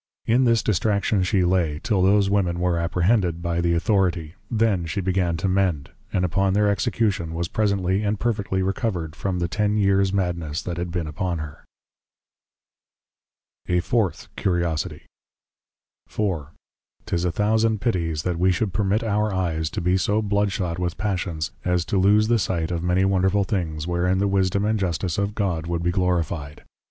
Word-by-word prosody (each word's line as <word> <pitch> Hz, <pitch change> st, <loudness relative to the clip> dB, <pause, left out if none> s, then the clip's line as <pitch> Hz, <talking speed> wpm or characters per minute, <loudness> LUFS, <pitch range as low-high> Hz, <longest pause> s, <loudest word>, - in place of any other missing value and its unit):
In 125 Hz, +3 st, +3 dB
this 115 Hz, -2 st, +3 dB
Distraction 105 Hz, 0 st, +1 dB
she 95 Hz, 0 st, +2 dB
lay, 85 Hz, -5 st, +1 dB
till 105 Hz, -5 st, +1 dB
those 100 Hz, +1 st, +4 dB
women 95 Hz, -4 st, +1 dB
were 90 Hz, -1 st, +1 dB
Apprehended, 90 Hz, +1 st, +1 dB
by 85 Hz, 0 st, -1 dB
the 85 Hz, 0 st, +2 dB
Authority; 85 Hz, -4 st, +1 dB, 0.2 s
then 110 Hz, -7 st, +1 dB
she 85 Hz, -, -3 dB
began 90 Hz, -2 st, 0 dB
to 85 Hz, -, -1 dB
mend; 90 Hz, -7 st, 0 dB, 0.2 s
and 90 Hz, -1 st, +1 dB
upon 95 Hz, +2 st, +1 dB
their 105 Hz, +1 st, +3 dB
Execution, 100 Hz, -5 st, 0 dB
was 85 Hz, +1 st, -2 dB
presently 100 Hz, -2 st, 0 dB
and 105 Hz, -1 st, -1 dB
perfectly 100 Hz, -5 st, -1 dB
Recovered, 95 Hz, -5 st, -2 dB
from 95 Hz, -1 st, -2 dB
the 85 Hz, -1 st, 0 dB
ten 105 Hz, +3 st, 0 dB
years 100 Hz, -1 st, +3 dB
madness 85 Hz, -5 st, -2 dB
that 85 Hz, -2 st, -4 dB
had 85 Hz, 0 st, -3 dB
been 85 Hz, -1 st, -2 dB
upon 85 Hz, +3 st, -2 dB
her. 75 Hz, -2 st, -8 dB, 2.0 s
A 90 Hz, 0 st, +3 dB
FOURTH 105 Hz, +2 st, -1 dB
CURIOSITIE. 85 Hz, -5 st, -1 dB, 1.0 s
IV. 95 Hz, -9 st, -1 dB, 0.6 s
'Tis 85 Hz, 0 st, -1 dB
a 90 Hz, -, +1 dB
thousand 110 Hz, +2 st, +1 dB
pitties, 85 Hz, -9 st, -1 dB
that 90 Hz, -2 st, -2 dB
we 95 Hz, +1 st, +4 dB
should 95 Hz, +2 st, -1 dB
permit 105 Hz, +1 st, +1 dB
our 105 Hz, -1 st, 0 dB
Eyes, 85 Hz, -4 st, -1 dB
to 80 Hz, -, -4 dB
be 90 Hz, +2 st, +2 dB
so 105 Hz, +3 st, +1 dB
Blood 100 Hz, 0 st, +1 dB
shot 90 Hz, -3 st, -2 dB
with 90 Hz, -1 st, -2 dB
passions, 90 Hz, -6 st, -2 dB
as 90 Hz, -2 st, 0 dB
to 100 Hz, -, 0 dB
loose 105 Hz, +3 st, +4 dB
the 115 Hz, +1 st, +2 dB
sight 85 Hz, -4 st, -1 dB
of 85 Hz, -2 st, -2 dB
many 90 Hz, +2 st, +2 dB
wonderful 95 Hz, +1 st, +2 dB
things, 85 Hz, -6 st, -2 dB
wherein 90 Hz, +2 st, +1 dB
the 100 Hz, +1 st, +1 dB
Wisdom 100 Hz, +1 st, +1 dB
and 110 Hz, 0 st, +1 dB
Justice 90 Hz, -1 st, -1 dB
of 100 Hz, +1 st, -1 dB
God, 85 Hz, -6 st, -1 dB
would 85 Hz, 0 st, -2 dB
be 85 Hz, -, +1 dB
Glorify'd. 85 Hz, -5 st, -1 dB
95 Hz, 170 wpm, -23 LUFS, 85-100 Hz, 2.0 s, those